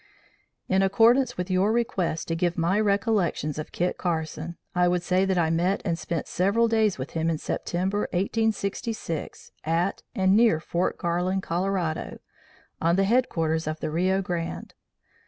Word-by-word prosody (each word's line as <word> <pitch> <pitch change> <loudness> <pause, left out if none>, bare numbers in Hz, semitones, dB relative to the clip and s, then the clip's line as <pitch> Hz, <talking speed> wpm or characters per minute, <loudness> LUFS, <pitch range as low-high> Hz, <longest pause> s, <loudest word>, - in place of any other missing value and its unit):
"In 190 0 +2
accordance 230 +7 +4
with 180 +1 -3
your 190 +3 +3
request 195 -8 -1
to 165 - 0
give 175 +1 0
my 175 +5 +2
recollections 200 -8 0
of 155 - -6
Kit 180 +1 -1
Carson, 165 -1 -3 0.2
I 180 0 +3
would 175 0 +1
say 185 +1 +2
that 190 -1 0
I 160 -2 +2
met 180 +4 +1
and 170 -3 +1
spent 165 -1 -3
several 200 +6 +2
days 220 -3 +2
with 130 +2 -6
him 165 0 0
in 165 - 0
September, 190 +6 -2
1866, 200 -2 -2
at 170 +4 0
and 190 -2 +3
near 220 -8 +4
Fort 170 +2 -1
Garland, 180 +2 -1
Colorado, 175 -2 -2 0.6
on 170 +1 +3
the 195 - +3
headwaters 165 -9 +1
of 155 0 -3
the - - -3
Rio 185 +4 +1
Grande. 170 -2 -4
180 Hz, 155 wpm, -26 LUFS, 165-200 Hz, 0.6 s, accordance